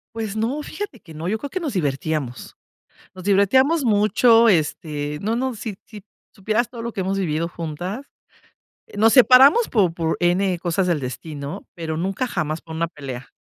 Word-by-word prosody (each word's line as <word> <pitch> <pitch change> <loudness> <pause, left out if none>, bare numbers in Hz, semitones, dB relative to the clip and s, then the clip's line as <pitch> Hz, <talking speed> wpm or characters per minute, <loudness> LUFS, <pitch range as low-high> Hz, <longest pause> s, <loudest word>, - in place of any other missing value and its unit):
Pues 220 -2 -4
no, 240 +7 -1
fíjate 315 - -7
que 165 - -14
no, 160 +2 -5
yo 220 +4 0
creo 280 +5 -7
que 370 - -2
nos 305 -8 -4
divertíamos 145 -5 -3 0.6
nos 185 - -10
divertíamos 260 - +3
mucho, 225 +2 +4
este, 150 -4 -1
no 225 +3 0
no, 260 0 -1
si 215 -2 -6
si 210 -3 -11 0.3
supieras 215 +4 -1
todo 235 -2 -8
lo 235 -1 -4
que - - -4
hemos 190 +1 -1
vivido 165 -3 -1
juntas, 175 - -6 0.9
nos 220 +2 +4
separamos 265 - +7
por 190 -8 +2
por 165 -1 -1
n 180 +1 +2
cosas 180 +1 0
del 165 -5 0
destino, 145 +6 -7
pero, 160 -2 -4
nunca 195 +8 -2
jamás 155 -7 -3
por 160 - -10
una 165 +1 -1
pelea, 135 -5 -8
195 Hz, 175 wpm, -22 LUFS, 160-230 Hz, 0.9 s, separamos